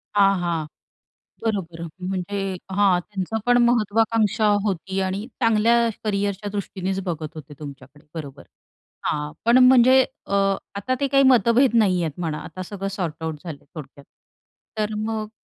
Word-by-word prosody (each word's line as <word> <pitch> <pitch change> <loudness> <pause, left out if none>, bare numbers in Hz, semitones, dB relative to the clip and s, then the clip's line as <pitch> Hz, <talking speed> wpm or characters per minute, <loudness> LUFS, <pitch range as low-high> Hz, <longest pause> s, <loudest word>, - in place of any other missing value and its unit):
हां, 195 -1 +5
हां. 170 -3 -1 0.8
बरोबर 190 -7 -2 0.2
म्हणजे 190 +1 -3
हां. 190 -2 +3
त्यांचं 200 +3 -4
पण 245 0 +5
महत्वाकांक्षा 220 -1 +2 0.2
होती 190 0 -2
आणि 190 +3 -2
चांगल्या 230 +1 +3 0.2
करिअरच्या 205 -1 -1
दृष्टीनेच 195 -1 -3
बघत 160 -3 -4
होते 150 -1 -10
तुमच्याकडे. 145 0 -11
बरोबर. 140 -3 -7 0.6
हां, 150 0 -1
पण 235 +2 +6
म्हणजे 260 +1 +7 0.2
अ, 200 - -5 0.4
आता 205 +6 -2
ते 280 - +1
काही 275 0 +4
मतभेद 245 0 +4
नाहीयेत 180 -8 +2
म्हणा 160 -3 -2
आता 185 - -8
सगळं 195 +1 -5
सॉर्ट 175 -5 -2
आउट 160 -1 -2
झालंय 150 -4 -8
थोडक्यात. 140 -2 -10 0.7
तर 215 0 -1
मग 215 0 -3
195 Hz, 135 wpm, -23 LUFS, 170-220 Hz, 0.8 s, म्हणजे